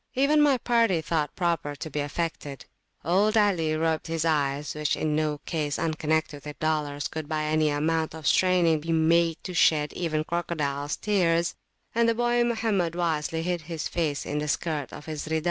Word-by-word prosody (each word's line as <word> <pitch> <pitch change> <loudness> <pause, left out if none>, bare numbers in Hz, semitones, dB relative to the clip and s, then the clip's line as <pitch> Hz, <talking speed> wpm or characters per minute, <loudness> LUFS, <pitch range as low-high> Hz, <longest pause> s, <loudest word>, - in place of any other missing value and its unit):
Even 285 +3 +4
my 285 -3 +4
party 230 -7 +2
thought 155 -2 -2
proper 170 -5 -1
to 155 +2 -6
be 150 - -2
affected: 145 -2 -4 0.4
old 205 +6 +3
Ali 175 -7 +2
rubbed 160 0 0
his 165 0 -1
eyes, 145 -2 0
which 150 -1 -1
in 155 -1 0
no 155 -1 0
case 150 -3 -2
unconnected 160 -2 -1
with 150 -1 -8
dollars 150 -2 -1
could 155 -1 -6
by 155 -1 -1
any 155 0 +2
amount 160 +2 0
of 160 -2 -9
straining 175 -1 +3
be 165 +2 -4
made 165 0 +3
to 180 - -6
shed 150 -3 +3
even 160 -3 -1
a - - -3
crocodiles 150 -4 -2
tear; 180 -6 +2 0.5
and 230 0 +3
the 230 - +1
boy 240 0 +2
Mohammed 220 -8 0
wisely 160 -2 -1
hid 175 -1 -1
his 165 -2 -3
face 155 -4 -2
in 150 - -2
the 150 - -3
skirt 150 -2 -2
of 150 - -10
his 155 -1 -5
Rida. 160 0 0
160 Hz, 185 wpm, -26 LUFS, 150-175 Hz, 0.5 s, Even